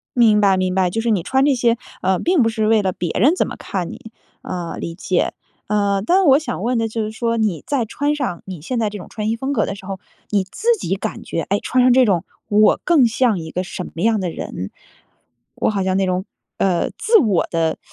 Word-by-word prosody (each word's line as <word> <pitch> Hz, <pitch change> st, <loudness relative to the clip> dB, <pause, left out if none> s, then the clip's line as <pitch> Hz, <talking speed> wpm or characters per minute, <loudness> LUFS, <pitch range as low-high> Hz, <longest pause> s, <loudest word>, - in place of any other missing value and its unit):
明 220 Hz, -3 st, +5 dB
白， 195 Hz, -2 st, +4 dB
明 185 Hz, 0 st, 0 dB
白， 185 Hz, -1 st, +2 dB
就 225 Hz, +5 st, -2 dB
是 235 Hz, -, -1 dB
你 200 Hz, -5 st, +2 dB
穿 265 Hz, +1 st, +2 dB
这 285 Hz, -, +4 dB
些， 235 Hz, -1 st, +2 dB, 0.2 s
呃， 185 Hz, 0 st, +1 dB
并 350 Hz, -3 st, +2 dB
不 225 Hz, -, +3 dB
是 220 Hz, -1 st, -1 dB
为 220 Hz, -1 st, +4 dB
了 190 Hz, -, 0 dB
别 175 Hz, -2 st, -3 dB
人 285 Hz, -, +5 dB
怎 -, -, 0 dB
么 -, -, -6 dB
看 180 Hz, -4 st, -4 dB
你， 225 Hz, -, -11 dB, 0.3 s
呃， 175 Hz, -2 st, -5 dB
理 165 Hz, 0 st, -5 dB
解。 185 Hz, 0 st, 0 dB, 0.3 s
呃， 200 Hz, -1 st, +1 dB
但 375 Hz, +6 st, +3 dB
我 275 Hz, -2 st, +6 dB
想 300 Hz, -10 st, -5 dB
问 245 Hz, +1 st, +1 dB
的 225 Hz, 0 st, +1 dB
就 225 Hz, 0 st, -3 dB
是 215 Hz, -, -4 dB
说， 230 Hz, +1 st, -1 dB
你 210 Hz, -7 st, 0 dB
在 275 Hz, -4 st, +1 dB
穿 290 Hz, +6 st, -1 dB
上 250 Hz, -, -3 dB
你 185 Hz, -5 st, -8 dB
现 240 Hz, -, -3 dB
在 220 Hz, -, +1 dB
这 205 Hz, -, -7 dB
种 180 Hz, -, -10 dB
穿 215 Hz, -1 st, -3 dB
衣 225 Hz, -, 0 dB
风 265 Hz, +4 st, -3 dB
格 220 Hz, -7 st, +1 dB
的 -, -, -4 dB
时 195 Hz, -1 st, -12 dB
候， 195 Hz, -1 st, -5 dB, 0.3 s
你 200 Hz, -2 st, +1 dB
自 440 Hz, -, -8 dB
己 190 Hz, -, -1 dB
感 190 Hz, -, -5 dB
觉， 165 Hz, -, -3 dB
诶， 200 Hz, +1 st, +2 dB
穿 255 Hz, 0 st, +1 dB
上 255 Hz, -, +5 dB
这 255 Hz, 0 st, +5 dB
种 185 Hz, -6 st, +1 dB, 0.2 s
我 210 Hz, +1 st, +4 dB
更 325 Hz, -8 st, +4 dB
像 230 Hz, -2 st, +1 dB
一 160 Hz, -1 st, -7 dB
个 185 Hz, -, -2 dB
什 180 Hz, -, -6 dB
么 170 Hz, -, -6 dB
样 220 Hz, -1 st, +2 dB
的 180 Hz, -, -1 dB
人？ 95 Hz, -, -6 dB, 0.8 s
我 -, -, +1 dB
好 200 Hz, -3 st, -1 dB
像 185 Hz, 0 st, +1 dB
那 195 Hz, -, +2 dB
种 185 Hz, +1 st, -1 dB, 0.3 s
呃， 180 Hz, -3 st, +1 dB
自 455 Hz, 0 st, +3 dB
我 210 Hz, -, +2 dB
的， 165 Hz, -1 st, 0 dB
210 Hz, 265 characters per minute, -20 LUFS, 185-240 Hz, 0.8 s, 我